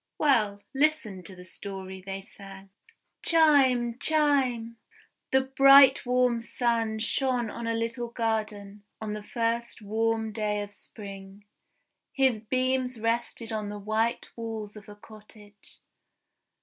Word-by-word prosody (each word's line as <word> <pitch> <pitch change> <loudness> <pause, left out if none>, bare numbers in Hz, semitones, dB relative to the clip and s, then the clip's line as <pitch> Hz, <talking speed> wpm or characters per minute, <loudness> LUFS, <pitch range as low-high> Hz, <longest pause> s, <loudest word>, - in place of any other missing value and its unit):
"Well, 215 -9 +2
listen 280 -9 +1
to 190 - -10
the 180 0 -12
story 190 0 -7
they 195 0 -5
sang: 195 0 -13 0.5
"Chime! 265 -7 +3
Chime! 270 -7 +1 0.3
" - - -40
The 265 - +4
bright 270 0 +6
warm 250 -1 +2
Sun 230 -2 0
shone 240 0 0
on 235 - -6
a 230 - 0
little 230 +1 -2
garden, 215 -3 -3 0.2
on 215 -1 -4
the 210 - -5
first 230 +3 -2
warm 220 +1 -1
day 210 -1 -1
of 205 0 -10
Spring. 200 -1 -10 0.7
His 260 -5 +2
beams 255 +1 0
rested 230 0 -2
on 210 -1 -3
the 205 - -6
white 220 +3 -1
walls 220 -2 -6
of 210 0 -12
a 205 - -10
cottage. 210 -1 -16
225 Hz, 130 wpm, -27 LUFS, 205-250 Hz, 0.7 s, bright